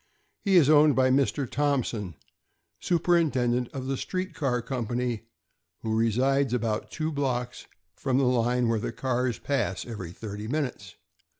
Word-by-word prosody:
He 195 -3 +3
ie 155 -6 +6
owned 150 -1 +6
by 130 0 +4
Mr. 140 0 +1
Thomp 145 -1 +1
son, 100 -8 -5 0.6
superintendent 145 -9 +1
of 130 -2 -5
the 135 0 -1
street 185 +6 -3
car 135 -7 0
company, 120 -2 -3 0.6
who 110 -1 -1
resides 125 +4 +2
about 110 -3 -2
two 160 0 -3
blocks 125 -4 -2 0.3
from 130 -2 0
the 135 - +3
line 125 -1 +2
where 115 -1 +1
the - - -3
cars 125 -2 -1
pass 140 -1 -1
every 105 -8 -6
thirty 105 +2 -7
minutes. 125 - -3
125 Hz, 145 wpm, -27 LUFS, 115-140 Hz, 0.6 s, ie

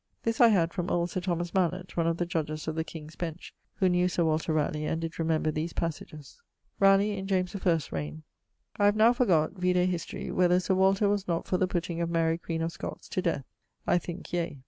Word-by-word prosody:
This 230 +1 0
I 240 - +9
had 175 -6 +2
from 180 -2 -3
old 175 0 0
Sir - - -2
Thomas 175 -1 -2
Malett, 185 0 -1
one 165 -1 +1
of 165 0 +1
the 175 - 0
Judges 155 -3 -3
of 160 - -1
the 160 0 -1
King's 155 -1 -10
Bench, 170 -1 -6 0.2
who 190 - +2
knew 180 0 +3
Sir 175 -1 0
Walter 160 +1 0
Ralegh, 155 0 0
and 160 - -1
did 165 0 -5
remember 160 -1 +1
these 155 +3 -3
passages. 155 - -5 0.4
<_Raleigh 195 +1 +5
in 190 0 -5
James 185 -1 0
I's 165 -6 +1
reign._> 75 0 -5 0.6
I 205 - +4
have 205 +1 +4
now 225 +3 +6
forgott 185 - +2
(vide 180 0 +2
History) 180 -1 -1
whether 180 0 +3
Sir 185 +1 0
Walter 195 +2 +3
was 205 -1 0
not 170 -1 -1
for 185 - 0
the 185 - +2
putting 175 -1 -2
of 170 - -1
Mary, 165 0 +1
queen 165 -1 -3
of 165 - -1
Scotts, - - -7
to 185 - -1
death; 165 -7 -1 0.4
I 175 - +3
thinke, 175 +1 -8
yea. 170 -4 -2
175 Hz, 225 wpm, -28 LUFS, 160-185 Hz, 0.6 s, I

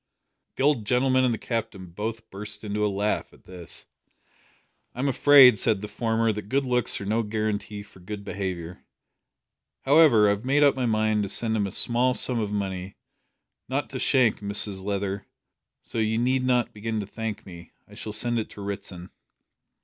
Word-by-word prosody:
The - - -2
old 140 -7 +2
gentleman 130 +1 +2
and 125 - +2
the 115 - -2
Captain 110 -7 -5
both 110 +4 -5
burst 105 +2 -6
into 105 0 -2
a - - +3
laugh 100 +2 -2
at - - -22
this. 90 -2 -4 1.1
"I'm 130 +3 -1
afraid," 135 -4 +7
said 110 -4 +1
the 105 - -5
former, 115 0 0
"that 105 0 -7
good 140 +2 +1
looks 125 -2 0
are 100 - -6
no 110 +3 0
guarantee 105 -1 -3
for 100 - -18
good 100 +3 -8
behaviour. 90 -3 -5 1.0
However, 140 -6 +5
I 100 - +4
have 100 +2 -3
made 140 +3 +2
up 140 - +4
my 130 -2 -1
mind 110 -1 +1
to 100 - -3
send 110 +2 +1
him 105 -2 0
a - - -7
small 125 +4 +4
sum 125 -2 +3
of 105 -2 -2
money 95 -2 -4 0.7
not - - -2
to - - -5
Shank, 125 -5 +3
Mrs 100 -1 0
Leather, 100 0 -3 0.6
so - - -5
you 110 0 0
need 130 +2 +1
not 125 -2 +1
begin 110 +1 -4
to - - -6
thank 110 +1 -6
me. 85 -2 -12
I - - -17
shall 110 - -6
send 120 +2 0
it 110 - -5
to 105 - -11
Ritson." 95 -3 -7
110 Hz, 185 wpm, -25 LUFS, 100-120 Hz, 1.1 s, afraid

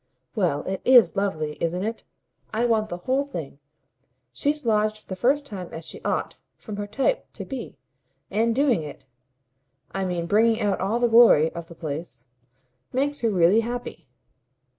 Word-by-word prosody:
"Well, 175 - 0
it 190 0 -4
IS 250 -5 +6
lovely, 155 -7 -2
isn't 175 +3 -1
it? 225 +2 -4 0.5
I 225 +2 0
want 220 -2 +1
the 175 - -4
whole 260 +10 0
thing. 160 - -7 0.7
She's 290 - -1
lodged 215 -1 +2
for 215 - -20
the 185 - -4
first 275 +9 +1
time 190 -8 -7
as 165 0 -7
she - - -8
ought, - - -2 0.2
from 210 -3 -8
her 205 0 -4
type, 275 - -1
to - - -7
be; 265 -4 -7 0.5
and 225 +2 +1
doing 260 - +3
it 150 -3 -9 0.9
I 195 0 -2
mean 175 -2 -2
bringing 220 +5 +3
out 205 -3 0
all 205 +5 0
the 240 0 +2
glory 225 -9 +6
of 170 -1 -7
the 170 - -12
place 150 -5 -6 0.7
makes 285 +3 0
her 230 - +1
really 185 +1 +4
happy. 235 - -5
210 Hz, 170 wpm, -24 LUFS, 175-240 Hz, 0.9 s, IS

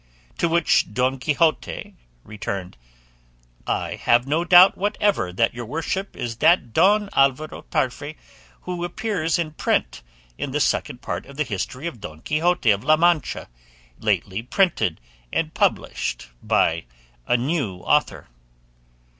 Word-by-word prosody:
To 170 - +2
which 165 -10 +2
Don 130 +1 +1
Quixote 155 +4 0 0.3
returned, 100 -3 -6 0.9
"I - - -1
have 120 +1 +3
no 155 +5 0
doubt 180 +2 +7
whatever 205 - 0
that 115 +6 +1
your 120 -1 -7
worship 165 - -3
is 115 -1 -4
that 125 -9 +3
Don 205 - +4
Alvaro 140 +3 +1
Tarfe 145 +4 -2 0.5
who 180 -1 -5
appears 175 -3 -1
in 165 -3 -2
print 155 - -1 0.4
in - - -4
the - - 0
Second - - -1
Part - - -4
of 140 - -13
the 150 - +1
history 125 - -5
of 125 -11 -5
Don 80 -4 -9
Quixote 165 -5 +2
of 100 +1 0
La 155 +3 +4
Mancha, 170 -4 +1 0.5
lately 95 +4 -1
printed 125 - +1 0.3
and 160 -1 -1
published - - -1
by 80 0 +1 0.4
a 125 - +3
new 130 - -1
author." - - +1
150 Hz, 135 wpm, -23 LUFS, 120-175 Hz, 0.9 s, doubt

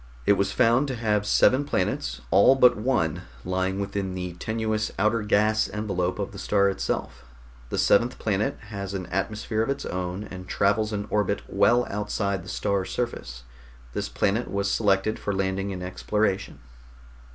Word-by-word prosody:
It - - +6
was 100 0 0
found 120 +4 +3
to 130 - -3
have 105 -3 0
seven 130 +6 +4
planets, 95 -10 -2
all 100 +9 +6
but 125 -2 +6
one 105 - 0 0.2
lying 95 +1 -1
within 100 -1 -3
the 90 -1 -4
tenuous 110 +3 -2
outer 105 +3 +2
gas 105 +1 +2
envelope 95 -4 -2
of 100 -2 -3
the 100 - -9
star 100 -1 +2
itself. 95 - -3 0.5
The - - -3
seventh 120 +5 +3
planet 105 0 -1
has 100 -2 -5
an 95 -1 -3
atmosphere 105 +3 -1
of 115 - -1
its 140 - -2
own, 90 +2 -3
and 90 -3 -9
travels 105 +3 +1
an 100 -1 -2
orbit 105 -1 0
well 120 +5 +3
outside 100 -2 -2
the 90 - -10
star 100 +1 0
surface. 65 - -4 0.5
This - - -3
planet 110 +5 0
was 100 0 -1
selected 105 0 +1
for 100 - -2
landing 95 +1 -1
and 90 -2 -5
exploration." 100 +2 -1
100 Hz, 165 wpm, -25 LUFS, 95-110 Hz, 0.5 s, It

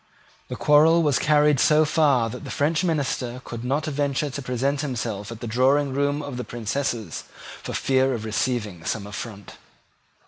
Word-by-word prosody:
The - - -5
quarrel 160 +3 +5
was 145 -4 +2
carried 150 -2 +3
so 155 +2 +4
far 145 -7 +3
that 125 - -8
the - - -7
French 155 +4 0
minister 135 -7 -1
could 115 0 -7
not 140 +5 -1
venture 145 -1 -1
to 140 - -5
present 135 +3 -1
himself 115 -7 -4
at 115 - -9
the - - -4
drawing 135 +4 +2
room 145 +1 0
of 140 -3 -6
the 125 - -3
Princess 120 0 -3 0.4
for - - -6
fear 130 -1 +2
of 110 -1 -6
receiving 110 -5 -2
some 110 +1 -3
affront. 100 -1 -8
130 Hz, 170 wpm, -24 LUFS, 120-145 Hz, 0.4 s, quarrel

